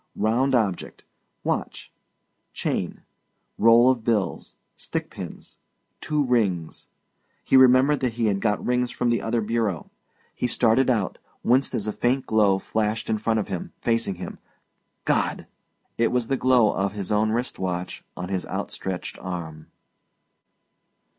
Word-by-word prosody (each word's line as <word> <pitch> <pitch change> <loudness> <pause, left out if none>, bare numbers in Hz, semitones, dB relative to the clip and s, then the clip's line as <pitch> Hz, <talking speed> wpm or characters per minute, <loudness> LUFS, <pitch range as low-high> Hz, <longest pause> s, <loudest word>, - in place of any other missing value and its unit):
Round 125 +6 +2
object 105 -7 -1 0.4
watch; - - -3 0.6
chain; - - -2 0.6
roll 115 +3 +7
of 120 -4 -3
bills; 105 -6 -1 0.2
stick - - -4
pins; - - -9 0.4
two 150 -1 0
rings 100 - 0 0.6
he - - +2
remembered 130 +2 +6
that 125 -3 -1
he 115 0 -1
had 100 -2 +1
got 105 -2 0
rings 125 0 +1
from 125 -1 0
the 115 -3 +1
other 115 +1 0
bureau. 110 -5 -1 0.4
He 125 - -1
started 125 +2 +3
out 110 -6 0 0.2
winced 130 +3 +2
as 105 - -2
a 105 - -1
faint 130 +2 0
glow 105 -3 +3
flashed 110 +2 -2
in 110 - 0
front 110 +1 +1
of 105 - -3
him, 95 - -5
facing 115 -4 0
him. 90 +1 -8 0.7
God! - - 0 0.5
it 115 - +3
was 125 -2 0
the 135 - +2
glow 125 -4 +4
of 100 +1 -1
his 100 -2 -5
own 105 +1 +2
wrist 120 +3 -2
watch 90 -1 -3
on 90 0 -5
his 95 -2 -2
outstretched 95 -2 -5
arm. 85 -4 -6
110 Hz, 145 wpm, -24 LUFS, 100-125 Hz, 0.7 s, roll